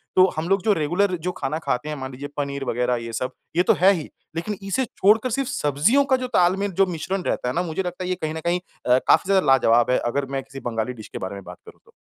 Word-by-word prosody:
तो 185 - +7
हम 160 +3 -2
लोग 195 0 +3
जो 215 -1 +4
रेगुलर 180 +4 +1
जो - - +1
खाना 155 +1 -3
खाते 150 -1 -2
हैं 150 - -3
मान 130 0 -6
लीजिए 140 +3 -7
पनीर 140 -1 -2
वग़ैरह 125 0 0
ये 115 - -7
सब, 130 +3 -2 0.2
ये 175 - +4
तो - - +4
है 190 +2 +7
ही। 165 -6 -5 0.3
लेकिन 195 +5 -3
इसे 195 +7 0
छोड़कर 215 +3 +2
सिर्फ़ 270 +3 -1
सब्ज़ियों 150 - +2
का 270 -1 +3
जो 255 0 -4
ताल-मेल 190 +3 +2
जो - - +7
मिश्रण 185 +2 -3
रहता 125 - -1
है 125 - -3
ना 175 - +1
मुझे 175 +2 -3
लगता 180 0 -5
है 180 - -3
ये 185 - +1
कहीं 155 0 -2
न - - -3
कहीं 175 +1 +2 0.3
अ, 125 +1 +5
काफ़ी - - +4
ज़्यादा 190 -4 +4
लाजवाब 120 -2 +4
है। 125 - +4
अगर 140 +2 -1
मैं 135 - -2
किसी 135 +1 -10
बंगाली 115 +1 -2
डिश 110 -3 -11
के - - -4
बारे 95 +1 -5
में 100 - -9
बात - - -10
करूँ - - -14
तो। - - -22
160 Hz, 275 wpm, -23 LUFS, 135-190 Hz, 0.3 s, तो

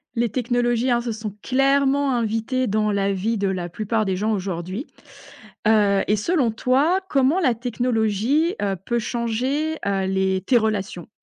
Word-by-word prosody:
Les 235 -1 +1
technologies, 240 +1 0
hein, 240 0 +2
se 235 - -3
sont 215 -2 -6
clairement 275 +1 +2
invitées 230 +3 -1
dans 215 +1 +1
la 200 -1 0
vie 220 +4 -1
de 200 - 0
la 180 -2 -3
plupart 215 +4 -1
des 190 -1 0
gens 210 +4 -1
aujourd'hui, 190 - -4 0.8
heu 205 -3 +4
et 210 - +3
selon 255 - +1
toi, 270 +10 +2
comment 275 +6 +2
la 265 -10 +2
technologie 240 - 0
heu, 200 -1 0
peut 240 0 0
changer 250 +7 -2
heu, 195 -1 0
les 190 0 0
tes 250 - +4
relations? 210 -5 -2
225 Hz, 160 wpm, -22 LUFS, 200-255 Hz, 0.8 s, heu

